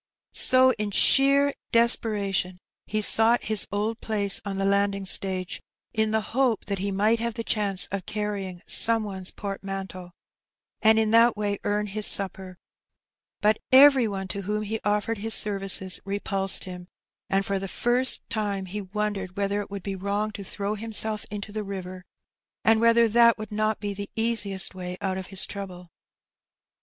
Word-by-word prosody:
So 260 0 +4
in 210 -1 -2
sheer 275 +6 +3 0.2
desperation 205 -6 +3 0.3
he 215 0 -1
sought 225 +3 +5
his 215 -2 +1
old 215 +3 -2
place 205 -3 0
on 200 -1 -5
the 195 - -1
landing 200 0 0
stage^ 190 0 0 0.3
in 220 -1 0
the 220 0 0
hope 255 -4 +1
that 200 -2 -3
he 200 +2 -2
might 210 +4 +1
have 235 -1 -3
the 230 - -4
chance 200 -4 +3
of 195 -1 -5
carrying 200 -4 -4
some 230 -1 +4
one's 190 -3 -3
portmanteau^ 195 -2 -7 0.7
and 220 0 +5
in 220 -1 +1
that 230 0 +4
way 205 -1 -2
earn 210 0 -1
his 210 +1 -1
supper; 190 -2 -4 0.8
but 215 +1 +2
every 265 -2 +7
one 195 -2 -5
to 200 +2 -4
whom 210 +2 -3
he 220 +2 -4
offered 210 +1 -1
his 220 +2 +1
services 195 -2 -1
repulsed 195 -1 -2
him, 180 -1 -9 0.4
and 195 0 0
for 195 -1 -2
the 195 - -5
first 245 +6 +1
time 205 -3 -3
he 205 +3 -6
wondered 195 -1 -4
whether 200 +1 -1
it 205 - -9
would 200 -2 -7
be 195 -1 -4
wrong 200 +3 -2
to 200 - -8
throw 200 +2 -4
himself 215 0 +1
into 205 0 -7
the 215 0 -4
river, 185 -2 -7 0.6
and 225 0 +3
whether 230 0 +4
that 235 +1 +4
would 215 -1 -8
not 215 0 -1
be 205 -1 -4
the 200 0 -7
easiest 220 -5 -2
way 180 -1 -7
out 190 -2 -3
of 190 - -8
his 190 -1 +1
trouble. 180 -4 -9
205 Hz, 170 wpm, -25 LUFS, 195-220 Hz, 0.8 s, every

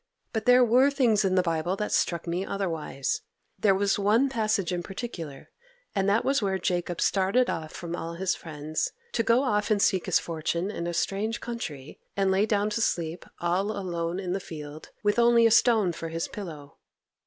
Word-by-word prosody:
But 220 - -2
there 250 0 +7
were 250 +4 +5
things 240 -7 +2
in 190 -1 +1
the 185 - +4
Bible 165 +1 0
that 210 +1 -3
struck 170 -2 +1
me 175 +2 -1
otherwise; 165 -9 -2 0.4
there 195 -1 +4
was 200 +1 +1
one 220 +7 +3
passage 215 -7 0
in 175 - -1
particular, 170 - -7 0.4
and 195 -1 +1
that 215 +3 +2
was 275 -1 +2
where 195 -2 0
Jacob 175 -1 -2
started 200 +6 +2
off 155 -1 -5
from 170 0 -5
all 165 0 -5
his 185 +2 0
friends, 155 -1 -4 0.2
to - - +1
go 230 +3 +3
off 210 -5 0
and 210 -2 +3
seek 190 -2 +2
his - - +4
fortune 170 +3 -2
in 170 -4 -4
a 175 - -2
strange 210 +6 -1
country, 155 - -6 0.2
and 195 -1 +2
lay 195 +3 +2
down 210 0 +1
to 230 - -1
sleep 170 -4 -1
all 180 +4 +1
alone 175 -4 -3
in 180 -2 -3
the 195 - -1
field, 150 -3 -9
with 205 +2 +2
only 235 0 +5
a 230 - +5
stone 220 -5 +4
for 165 0 -6
his 165 +1 -3
pillow. 155 -8 -9
190 Hz, 195 wpm, -27 LUFS, 170-215 Hz, 0.4 s, there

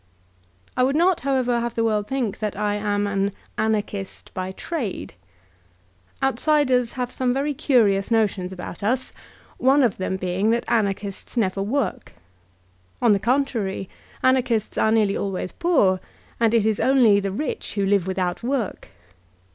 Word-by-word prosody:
I 255 - +1
would 265 +2 +2
not, 350 +2 +3
however, 255 -3 +1
have 235 0 -3
the 230 - +1
world 210 -2 0
think 240 -6 -2
that 210 -2 -2
I 205 -1 0
am 205 0 0
an 200 0 0 0.2
^Anarchist 210 -3 -2
by 185 0 -3
trade.*' 245 - -4 1.1
Outsiders 265 -2 +2
have 250 -1 -3
some 255 -1 0
very 285 +2 0
cunous 215 -8 +2
notions 205 -5 +1
about 180 -2 -8
us, 245 +6 -1 0.5
one 270 +2 +4
of 235 -6 +1
them 190 0 -2
being 185 +3 0
that 235 +1 +1
Anarch 205 -3 +1
ists 200 +4 -7
never 195 -3 +1
work. 255 +8 -2 0.9
On 235 - +4
the 200 - +4
contrary, 225 -5 -1 0.3
Anarchbts 255 -4 +2
are 220 - +3
nearly 215 -3 +3
always 190 -2 -3
poor, 275 - +2 0.4
and 230 0 +3
it 220 -2 +3
is 220 -1 +1
only 245 -6 +5
the 195 -1 -2
rich 255 0 -4
who 200 -2 +1
live 195 -2 +2
without 185 -1 -1
work. 245 -3 -2
220 Hz, 155 wpm, -23 LUFS, 195-255 Hz, 1.1 s, only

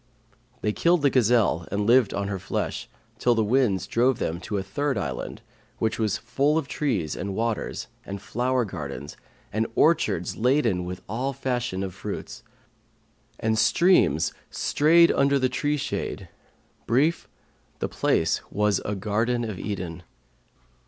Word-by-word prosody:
They 105 - +1
killed 170 +3 +2
the 140 - +4
gazelle, 110 -8 +3
and 100 +1 0
lived 120 -1 +5
on 100 0 -2
her 100 -1 -3
flesh, 95 - -3 0.3
till 120 -1 +3
the 110 - +2
winds 110 -4 +2
drove 125 +1 +2
them 85 +1 -2
to 105 - -3
a 95 - -2
third 140 +9 -1
island - - -4 0.3
which 110 0 -1
was 110 -2 +1
full 145 +3 +1
of 160 - -1
trees 110 - -1
and 95 +1 -4
waters 115 0 -2 0.2
and 100 0 -6
flower 125 +4 0
gardens 75 -6 -6 0.4
and 110 +2 +1
orchards 105 - +2
laden 115 -7 +2
with 90 0 -6
all 125 +6 -2
fashion 120 -7 -2
of 95 -2 -4
fruits: - - -6 1.0
and 110 0 +1
streams 170 - +4 0.2
strayed 170 +3 +4
under 140 0 +3
the 130 -1 +1
tree 145 +2 0
shade: 135 - -4 0.6
brief, 140 +8 +2 0.5
the - - -2
place - - +1
was 105 -1 +1
a 105 - -2
Garden 115 +5 0
of 105 -6 -4
Eden. 90 -5 -4
115 Hz, 145 wpm, -25 LUFS, 100-130 Hz, 1.0 s, lived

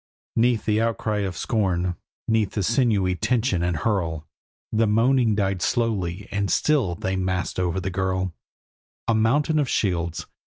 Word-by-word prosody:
'Neath 115 -1 +2
the 110 0 +2
outcry 110 -2 0
of 95 -3 -3
scorn, 90 -5 0 0.3
'neath 110 -3 +1
the 105 - -1
sinewy 105 -3 +2
tension 115 0 0
and 85 -2 0
hurl, 80 -5 -1 0.5
The 110 0 +2
moaning 115 +1 +3
died 95 -3 0
slowly, 100 -6 -1
and 100 -1 -1
still 130 -13 +2
they 95 +3 -2
massed 95 -1 -2
over 90 0 0
the 95 +1 -3
girl 95 -1 -1 0.7
A 115 - +3
mountain 140 +8 +2
of 140 -4 0
shields! 85 -5 -1
100 Hz, 150 wpm, -24 LUFS, 90-115 Hz, 0.7 s, moaning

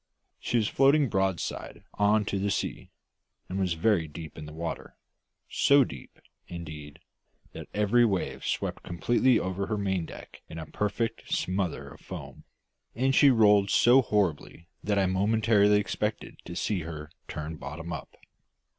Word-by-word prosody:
She 120 - -1
was 110 -3 +2
floating 140 0 +4
broadside 95 -3 -2
on 105 +1 +2
to 100 - -2
the 100 +1 0
sea, - - -3 0.6
and 95 +2 -4
was 95 -3 +1
very 85 -1 +2
deep 80 +1 -9
in 75 -1 -8
the - - -9
water, 80 +1 -6 0.5
so 140 0 +4
deep, 70 - -10 0.3
indeed, 75 -4 -8 0.6
that - - -8
every 105 +3 +3
wave 100 -6 -1
swept - - -2
completely 120 +8 +2
over 95 +1 -2
her 110 - -1
maindeck 95 -4 -4
in 80 - -8
a 80 - -5
perfect 105 +5 -3
smother 95 -2 -1
of - - -14
foam; - - -9 0.5
and 130 +3 +1
she 140 +1 +6
rolled 105 -5 +5
so 125 +6 +6
horribly 90 - -1 0.2
that 105 0 0
I 95 - +3
momentarily 105 +2 +3
expected 105 +2 -3
to 85 - -7
see 100 +2 -1
her 80 -2 -7 0.2
turn 75 +1 -6
bottom 80 +5 -7
up. 80 - -8
100 Hz, 150 wpm, -28 LUFS, 85-110 Hz, 0.6 s, she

